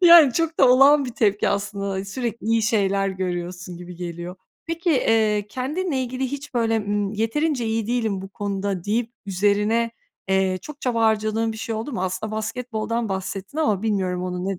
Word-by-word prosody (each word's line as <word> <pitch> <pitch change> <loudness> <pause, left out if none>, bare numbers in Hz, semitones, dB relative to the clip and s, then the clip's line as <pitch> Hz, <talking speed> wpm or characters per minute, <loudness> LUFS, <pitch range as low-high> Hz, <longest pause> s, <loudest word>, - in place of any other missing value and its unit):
yani, 335 -6 +9
çok 330 +3 -1
da 265 - +7
olağan 275 +3 +6
bir 250 - -4
tepki 205 -2 +2
aslında 200 -1 -2
sürekli 230 +2 -4
iyi 225 0 +3
şeyler 200 -3 +2
görüyorsun 180 -1 -4
gibi 180 0 -9
geliyor. 175 +1 -6 0.3
Peki, 335 +1 -1
eee, 220 -7 +2
kendinle 295 - -2
ilgili 255 +1 -3
hiç 280 +2 -5
böyle, 225 -2 +2
ımm, 205 -1 -1
yeterince 240 +4 0
iyi 220 -1 -1
değilim 225 -5 0
bu 195 - -7
konuda 195 -2 -3
deyip 225 +3 0 0.2
üzerine, 210 +4 +2 0.4
eee, 190 -1 +2
çok 300 +4 -9
çaba 235 -3 0
harcadığın 220 0 +1
bir 220 - -8
şey 225 +1 -3
oldu 225 +6 -4
mu? 185 - -2
Aslında 200 +4 -3
basketboldan 230 0 -2
bahsettin 195 +6 -4
ama 215 -11 +1
bilmiyorum 185 -4 0
onu 180 0 -3
ne 195 - -2
215 Hz, 175 wpm, -23 LUFS, 195-245 Hz, 0.4 s, yani